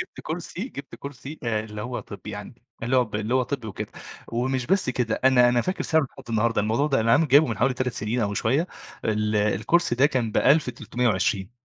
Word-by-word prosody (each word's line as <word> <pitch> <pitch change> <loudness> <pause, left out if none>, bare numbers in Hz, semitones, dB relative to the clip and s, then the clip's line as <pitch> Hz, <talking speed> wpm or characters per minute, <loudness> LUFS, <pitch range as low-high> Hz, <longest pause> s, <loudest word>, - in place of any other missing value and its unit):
جبت 365 - -7
كرسي 175 +5 -5
جبت 140 - -9
كرسي 140 +2 -8
اللي 110 -2 -2
هو 125 +2 -4
طبي 100 0 -9
يعني 105 +4 -9 0.2
اللي 125 +3 +1
هو 125 - +4
ب 110 -3 -14
اللي 110 +4 -1
هو 130 - +4
طبي 125 -3 -4
وكده، 95 - -6 0.4
ومش 125 +2 -1
بس 190 -6 +2
كده 120 -3 -1
أنا 125 -2 +6
أنا 120 0 +3
فاكر 185 +9 -2
سعره 160 -2 +3
لحد - - -14
النهارده 115 0 +2
الموضوع 110 +8 +1
ده 135 -5 +2
أنا 115 +1 +3
عامل 155 +2 +4
جابيه 145 +3 +6
من 110 -4 -3
حوالي 125 +2 +2
3 125 -1 -1
سنين 110 +3 -2
أو 105 -1 0
شوية 135 - +1 0.4
ال 105 0 0
الكرسي 105 - +2
ده 130 +4 +5
كان 125 -6 -1
1320 120 -8 +1
120 Hz, 205 wpm, -25 LUFS, 110-135 Hz, 0.4 s, أنا